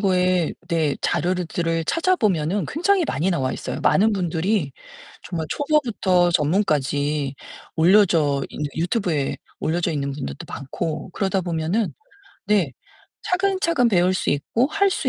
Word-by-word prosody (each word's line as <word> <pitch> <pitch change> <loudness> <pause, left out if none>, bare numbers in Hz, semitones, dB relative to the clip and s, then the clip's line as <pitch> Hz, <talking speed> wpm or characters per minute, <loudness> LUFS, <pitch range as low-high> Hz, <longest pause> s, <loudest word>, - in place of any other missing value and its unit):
거에 185 -3 +2 0.2
네 160 -5 +1
자료를 175 +1 0
들을 165 0 -1
찾아보면은 205 - +1
굉장히 355 +4 +2
많이 180 - 0
나와 130 -7 0
있어요. - - -5
많은 215 +3 +4
분들이 175 -3 0 0.6
정말 165 -3 -3
초보부터 230 - +2
전문까지 150 -4 +1 0.4
올려져 165 -5 +4
있는 150 - -4
유튜브에 170 -4 0 0.2
올려져 170 +2 0
있는 140 -2 -2
분들도 70 - -6
많고 155 +6 -5
그러다 195 0 0
보면은 175 +5 -1 0.5
네 195 -10 +2 0.9
차근차근 250 -8 +3
배울 180 -2 +3
수 - - -2
있고 225 - +1
할 400 +4 +2
수 - - -1
175 Hz, 300 characters per minute, -22 LUFS, 155-205 Hz, 0.9 s, 많은